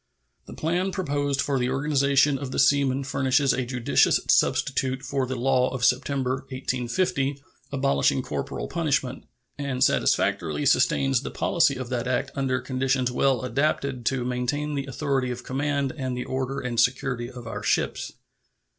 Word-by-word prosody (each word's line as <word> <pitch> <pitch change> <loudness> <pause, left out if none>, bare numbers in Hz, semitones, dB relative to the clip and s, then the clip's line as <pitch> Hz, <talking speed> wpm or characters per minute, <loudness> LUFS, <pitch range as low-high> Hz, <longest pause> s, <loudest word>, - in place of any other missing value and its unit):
The - - -9
plan 180 +4 -1
proposed 145 -6 -1
for 140 -2 0
the 125 0 0
organization 140 0 +2
of 140 - -5
the - - -5
seamen 140 -1 +3
furnishes 135 0 +2
a 125 -2 -2
judicious 125 -2 +3
substitute 130 0 +1
for 135 -3 -1
the 130 - -3
law 130 +1 +2
of 125 -2 -1
September, 130 0 +1
1850, 135 +2 -1 0.3
abolishing 135 -1 +1
corporal 125 - -4
punishment, 140 -6 -1 0.3
and 135 -2 -1
satisfactorily 90 - +1
sustains 135 -2 +3
the - - -5
policy 160 -5 +2
of 130 -2 -6
that 125 -1 -2
act 130 +2 -1
under 130 -2 0
conditions 130 -1 0
well 130 +1 +1
adapted 135 0 -1
to 130 -2 0
maintain 125 +4 -2
the 140 -1 -3
authority 135 -1 -1
of 125 0 -5
command 140 +1 -1
and 130 -4 -3
the 125 - -3
order 130 +1 -3
and 120 -2 -2
security 125 0 +1
of 125 -2 -10
our 115 - -5
ships. - - -1
135 Hz, 155 wpm, -25 LUFS, 125-140 Hz, 0.3 s, seamen